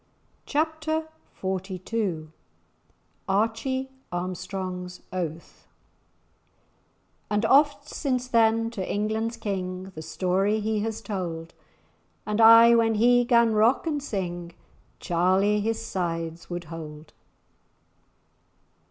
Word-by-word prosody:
*Chapter 315 Hz, +1 st, -1 dB, 0.3 s
XLII* 190 Hz, -2 st, -3 dB, 1.0 s
*Archie 230 Hz, +6 st, 0 dB, 0.2 s
Armstrong's 180 Hz, 0 st, -5 dB
Oath* 170 Hz, -3 st, -5 dB, 1.6 s
"And 210 Hz, +1 st, +1 dB
oft 290 Hz, +1 st, +4 dB
since 255 Hz, -5 st, -2 dB
then, 230 Hz, -1 st, +3 dB
to 195 Hz, -5 st, -4 dB
England's 220 Hz, +2 st, -1 dB
King, 190 Hz, -3 st, -4 dB
The 155 Hz, -, -7 dB
story 195 Hz, +6 st, 0 dB
he 215 Hz, 0 st, -1 dB
has 220 Hz, +1 st, -3 dB
told; 170 Hz, -5 st, -4 dB, 0.7 s
And 210 Hz, +1 st, 0 dB
aye, 230 Hz, +1 st, +9 dB
when 225 Hz, -1 st, +3 dB
he 245 Hz, +3 st, +5 dB
'gan 235 Hz, -2 st, +4 dB
rock 220 Hz, +8 st, +3 dB
and 300 Hz, -3 st, -1 dB
sing, 175 Hz, -8 st, -4 dB, 0.5 s
Charlie 190 Hz, +4 st, +2 dB
his 225 Hz, +1 st, -1 dB
sides 165 Hz, -2 st, -3 dB
would 175 Hz, 0 st, -4 dB
hold." 155 Hz, -1 st, -9 dB
210 Hz, 95 wpm, -26 LUFS, 180-230 Hz, 1.6 s, aye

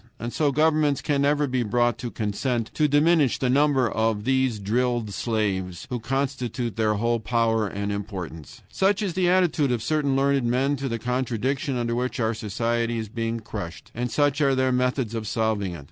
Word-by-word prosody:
And 120 Hz, +1 st, -5 dB
so 150 Hz, -2 st, +2 dB
governments 150 Hz, -1 st, +2 dB
can 140 Hz, -2 st, 0 dB
never 145 Hz, +1 st, +2 dB
be 130 Hz, -2 st, -1 dB
brought 120 Hz, +1 st, +1 dB
to 120 Hz, -, -4 dB
consent 115 Hz, +2 st, -2 dB
to 155 Hz, -, +2 dB
diminish 145 Hz, -1 st, +3 dB
the 125 Hz, -2 st, 0 dB
number 140 Hz, -2 st, +3 dB
of 110 Hz, -2 st, 0 dB
these 130 Hz, -2 st, +1 dB
drilled 115 Hz, +1 st, -1 dB
slaves, 95 Hz, -6 st, -2 dB
who 125 Hz, -, -1 dB
constitute 125 Hz, -3 st, -2 dB
their 110 Hz, -1 st, +1 dB
whole 115 Hz, +2 st, +1 dB
power 115 Hz, -1 st, +1 dB
and 100 Hz, +1 st, -3 dB
importance. 90 Hz, -6 st, -6 dB
Such 200 Hz, +2 st, +1 dB
is 190 Hz, -4 st, -1 dB
the 180 Hz, 0 st, +2 dB
attitude 175 Hz, -7 st, +2 dB
of 120 Hz, -2 st, -1 dB
certain 145 Hz, -2 st, +1 dB
learned 135 Hz, -1 st, +2 dB
men 130 Hz, +4 st, +1 dB
to 135 Hz, 0 st, -3 dB
the 115 Hz, -, -2 dB
contradiction 125 Hz, +2 st, -1 dB
under 120 Hz, -1 st, -1 dB
which 125 Hz, +2 st, -2 dB
our 110 Hz, -1 st, +1 dB
society 115 Hz, +2 st, -1 dB
is 110 Hz, -2 st, -4 dB
being 115 Hz, 0 st, -3 dB
crushed, 100 Hz, -6 st, -7 dB
and 120 Hz, +2 st, -2 dB
such 145 Hz, +1 st, +1 dB
are 135 Hz, -2 st, +3 dB
their 130 Hz, 0 st, +2 dB
methods 125 Hz, -2 st, 0 dB
of 110 Hz, -2 st, -4 dB
solving 110 Hz, -4 st, -1 dB
it. 85 Hz, -, -7 dB
120 Hz, 190 wpm, -25 LUFS, 110-140 Hz, -, diminish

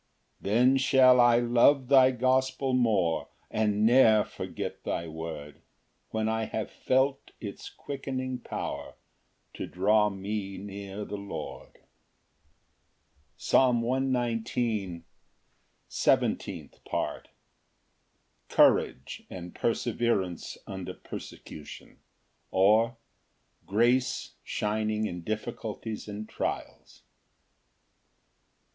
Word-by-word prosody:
6 -, -, -18 dB
Then 125 Hz, +6 st, +4 dB
shall 130 Hz, -1 st, +6 dB
I 120 Hz, -1 st, +6 dB
love 120 Hz, +3 st, +4 dB
thy 130 Hz, -1 st, +7 dB
gospel 130 Hz, +1 st, +1 dB
more, 105 Hz, -10 st, +2 dB, 0.2 s
And 105 Hz, -1 st, +1 dB
ne'er 110 Hz, -3 st, +6 dB
forget -, -, -6 dB
thy 85 Hz, -, -2 dB
word, 80 Hz, -2 st, -7 dB, 0.5 s
When 110 Hz, 0 st, -1 dB
I 110 Hz, 0 st, 0 dB
have 110 Hz, -1 st, -4 dB
felt 135 Hz, +1 st, 0 dB
its 100 Hz, -3 st, -7 dB
quickening 130 Hz, -2 st, -5 dB
power -, -, -5 dB, 0.6 s
To -, -, -5 dB
draw 105 Hz, +3 st, +3 dB
me 100 Hz, 0 st, -4 dB
near 100 Hz, +1 st, -7 dB
the 105 Hz, -, -5 dB
Lord. 100 Hz, -6 st, -8 dB, 1.6 s
Psalm 125 Hz, -3 st, +3 dB
119:17. 115 Hz, -7 st, -1 dB, 0.8 s
Seventeenth -, -, 0 dB
Part. -, -, -3 dB, 1.2 s
Courage 65 Hz, -, +3 dB
and 90 Hz, -1 st, -8 dB
perseverance 115 Hz, -6 st, -1 dB
under 95 Hz, -2 st, -6 dB
persecution; 75 Hz, -, -10 dB, 0.5 s
or, 110 Hz, +5 st, +3 dB, 0.7 s
Grace 120 Hz, +5 st, +1 dB
shining 110 Hz, 0 st, -1 dB
in 90 Hz, -4 st, -4 dB
difficulties 110 Hz, +2 st, -5 dB
and 105 Hz, +1 st, -6 dB
trials. -, -, -5 dB
110 Hz, 90 wpm, -28 LUFS, 100-125 Hz, 1.6 s, thy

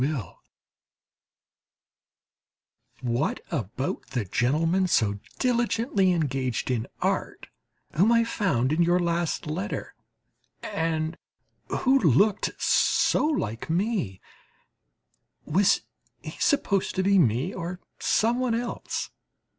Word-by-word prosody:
What 120 Hz, +4 st, 0 dB
about 130 Hz, -, -3 dB
the 125 Hz, -5 st, -2 dB
gentleman 165 Hz, -, +1 dB
so 105 Hz, -, +1 dB, 0.2 s
diligently 230 Hz, -5 st, +1 dB
engaged 135 Hz, -7 st, -1 dB
in 115 Hz, -3 st, -1 dB, 0.2 s
art -, -, -1 dB, 0.5 s
whom 195 Hz, +9 st, +4 dB
I 230 Hz, 0 st, +5 dB
found 155 Hz, -, 0 dB
in 165 Hz, -, +2 dB
your 175 Hz, +1 st, +4 dB
last 170 Hz, -1 st, -1 dB
letter, 150 Hz, -10 st, -4 dB, 0.7 s
and 160 Hz, 0 st, -2 dB, 0.5 s
who 270 Hz, +1 st, +2 dB
looked 190 Hz, -, +2 dB
so -, -, +3 dB
like 115 Hz, -, -2 dB
me 175 Hz, -, -1 dB, 1.3 s
was 185 Hz, +6 st, +3 dB, 0.4 s
he -, -, -6 dB
supposed 200 Hz, -, +1 dB
to 190 Hz, -, +1 dB
be 200 Hz, 0 st, +4 dB
me 130 Hz, -, +2 dB
or 180 Hz, 0 st, -5 dB, 0.2 s
somebody 235 Hz, +1 st, +1 dB
else? 240 Hz, 0 st, -4 dB
170 Hz, 95 wpm, -26 LUFS, 130-205 Hz, 1.3 s, I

